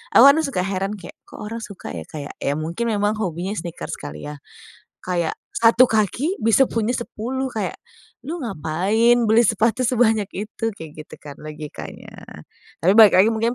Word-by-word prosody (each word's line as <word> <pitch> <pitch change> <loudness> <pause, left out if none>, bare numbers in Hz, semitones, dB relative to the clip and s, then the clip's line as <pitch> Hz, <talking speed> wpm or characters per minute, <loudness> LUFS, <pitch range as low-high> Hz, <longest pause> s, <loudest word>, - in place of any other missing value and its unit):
awan 280 +5 +8
suka 260 -12 -2
heran, 195 +2 -2
kayak 190 - -11
kok - - -14
orang 230 +2 -6
suka 200 -3 -8
ya, 80 - -5
kayak 145 -2 -7
ya 145 +2 -1
mungkin 170 +10 -3
memang 205 0 +1
hobinya 180 +2 -3
sneakers, 170 -4 -6
kali 75 +1 -8
ya. 150 -1 -8 0.6
Kayak 175 -3 -2 0.2
1 230 +2 +5
kaki 230 - 0
bisa 230 +4 +4
punya 230 0 -1
10 250 +2 -3
kayak, 200 -5 -3 0.5
"Lu 330 -1 -4
ngapain 195 +5 +1 0.2
beli 230 0 +5
sepatu 230 +4 +1
sebanyak 225 -5 +2
itu?" 215 +2 -4
kayak 155 -2 -10
gitu - - -12
kan 145 -1 -10
logikanya. 150 -1 -9 0.7
Tapi 185 +3 +5
balik 215 -2 +9
lagi 195 +5 +6
mungkin 230 +2 0
210 Hz, 165 wpm, -21 LUFS, 175-230 Hz, 0.7 s, balik